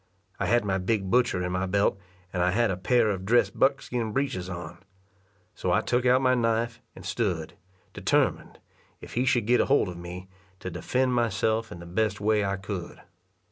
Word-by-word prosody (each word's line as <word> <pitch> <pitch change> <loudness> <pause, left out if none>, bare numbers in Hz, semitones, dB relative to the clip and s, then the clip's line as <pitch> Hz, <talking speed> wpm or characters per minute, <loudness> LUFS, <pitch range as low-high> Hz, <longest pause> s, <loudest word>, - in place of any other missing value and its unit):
I - - 0
had 120 -1 +3
my 95 -1 0
big 95 0 -1
butcher 120 -7 +2
in 90 - -2
my 90 +1 -1
belt, 100 +1 +1 0.3
and 90 - 0
I 90 - +3
had 110 +2 +2
a - - -1
pair 110 +5 +2
of 95 -2 -4
dressed 120 +5 +2
buckskin 125 -5 +1
breeches 130 -10 -1
on. 90 -1 -7 0.7
So - - -2
I - - +3
took 125 +1 +1
out 130 +2 +4
my 130 0 +4
knife, 115 -1 0
and 95 - -11
stood, 90 -4 -2 0.4
determined, - - 0 0.4
if - - -11
he 125 +2 +1
should 120 -4 +2
get 125 +2 +3
hold 135 -8 +2
of 90 - -7
me, 90 +2 -8 0.3
to 95 - -6
defend 125 +10 0
myself 115 -1 0
in - - -7
the 85 - -10
best 100 +3 -1
way 105 0 +2
I 100 0 0
could. 95 -2 -6
105 Hz, 190 wpm, -27 LUFS, 90-120 Hz, 0.7 s, out